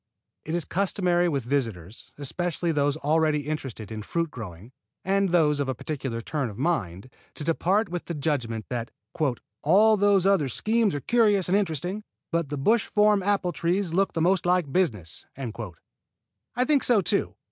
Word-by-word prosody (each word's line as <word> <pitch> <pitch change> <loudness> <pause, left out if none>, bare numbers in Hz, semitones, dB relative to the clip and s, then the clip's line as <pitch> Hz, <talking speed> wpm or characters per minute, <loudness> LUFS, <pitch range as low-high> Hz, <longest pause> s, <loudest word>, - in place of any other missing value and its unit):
It 160 - -2
is 175 - -1
customary 180 -2 +1
with 140 -5 -1
visitors, 115 - -3
especially 170 +4 -2
those 145 -1 +1
already 155 0 +2
interested 135 -8 -5
in 110 -1 -5
fruit 165 +8 -2
growing 105 - -9 0.3
and 195 0 +2
those 155 -4 +3
of 140 -2 -1
a 130 - -1
practical 135 -4 -4
turn 140 0 -2
of 105 - -10
mind, 125 - -1 0.3
to - - -4
depart 185 +7 +1
with 175 0 -5
the 170 - -4
judgment 125 -7 -2
that 120 -2 -3 0.7
"all 210 +8 +5
those 200 -2 +3
other 190 -9 +3
schemes 220 - +1
are 145 - -3
curious 210 - +3
and 190 - +3
interesting, 185 +1 -1 0.3
but 170 -4 0
the 145 - -3
bush 215 +11 +2
form 210 -1 +3
apple 195 -2 +1
trees 175 +1 -1
look 195 +2 +1
the 165 - -1
most 185 +2 +3
like 175 -5 +1
business." 110 - -1 1.3
I 250 +1 +2
think 285 -1 +3
so 235 -5 +4
too. 190 +3 -1
165 Hz, 170 wpm, -26 LUFS, 140-195 Hz, 1.3 s, all